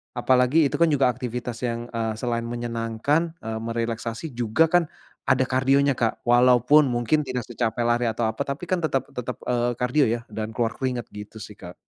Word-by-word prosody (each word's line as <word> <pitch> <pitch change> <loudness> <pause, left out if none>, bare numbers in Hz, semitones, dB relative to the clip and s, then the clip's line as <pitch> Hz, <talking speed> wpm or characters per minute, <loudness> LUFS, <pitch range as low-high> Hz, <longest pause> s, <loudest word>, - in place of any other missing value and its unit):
apalagi 130 +4 +3
itu - - -1
kan 170 - +5
juga 140 -5 +3
aktivitas 125 -1 -5
yang, 120 0 -4
eee, 115 -1 -2
selain 115 +1 -2
menyenangkan, 120 +7 -1
eee, 110 0 -4
merelaksasi 115 +4 -3
juga 120 +6 +1
kan 175 -1 +3 0.4
ada 130 0 +3
kardionya, 135 +1 +2
Kak. 115 -2 -1
Walaupun 125 +4 +5
mungkin 125 +4 0
tidak 125 -1 -3
secapek 120 0 -2
lari 120 +1 +1
atau 115 +1 -2
apa, 110 - -4
tapi 140 +3 -4
kan 185 - +2
tetep 155 -6 0
tetep, 125 0 -5
eee, 120 0 0
kardio 125 +4 +2
ya 115 +1 -1
dan 110 0 -5
keluar 115 -1 0
keringat 125 -3 -3
gitu 105 +1 -9
sih, 105 0 -11
Kak. 90 -1 -10
120 Hz, 180 wpm, -24 LUFS, 115-135 Hz, 0.4 s, kan